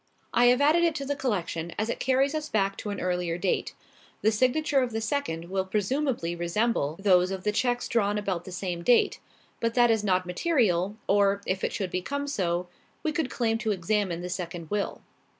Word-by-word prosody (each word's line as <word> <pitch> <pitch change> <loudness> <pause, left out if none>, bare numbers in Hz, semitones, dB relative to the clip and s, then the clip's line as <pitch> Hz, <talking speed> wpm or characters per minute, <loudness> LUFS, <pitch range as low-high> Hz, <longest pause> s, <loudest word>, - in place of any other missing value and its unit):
I 245 - +5
have 250 +2 +5
added 310 +4 +4
it 335 -2 +2
to 280 -2 -3
the 285 +1 -1
collection 175 - -2
as 215 - 0
it 235 - -3
carries 265 +2 +2
us 310 -1 -3
back 195 -2 +1
to 210 - -5
an 205 - -4
earlier 180 -2 -1
date. 180 +1 -1 0.5
The 220 - +4
signature 270 +6 +2
of 245 -3 -2
the 225 - -1
second 220 - -3
will 190 -1 +1
presumably 210 - -1
resembles 175 -3 0
those 180 -2 +5
of 190 -1 -4
the 210 - +1
cheques 245 +3 0
drawn 210 -3 +1
about 190 -4 -2
the 185 - -8
same 180 -1 -3
date. 235 +7 +3 0.4
But 230 0 -1
that 240 -1 +5
is 220 -2 +1
not 185 -2 +2
material, 195 - +1
or, 200 0 +3
if 185 0 -2
it - - 0
should 190 -3 -3
become 280 +11 -2
so, 180 -10 -1 0.4
we 315 - +1
could 305 -3 -1
claim 225 -2 0
to 225 - -2
examine 190 -2 0
the 180 - -4
second 175 -2 -5
will." 205 -1 -2
205 Hz, 205 wpm, -27 LUFS, 180-245 Hz, 0.5 s, I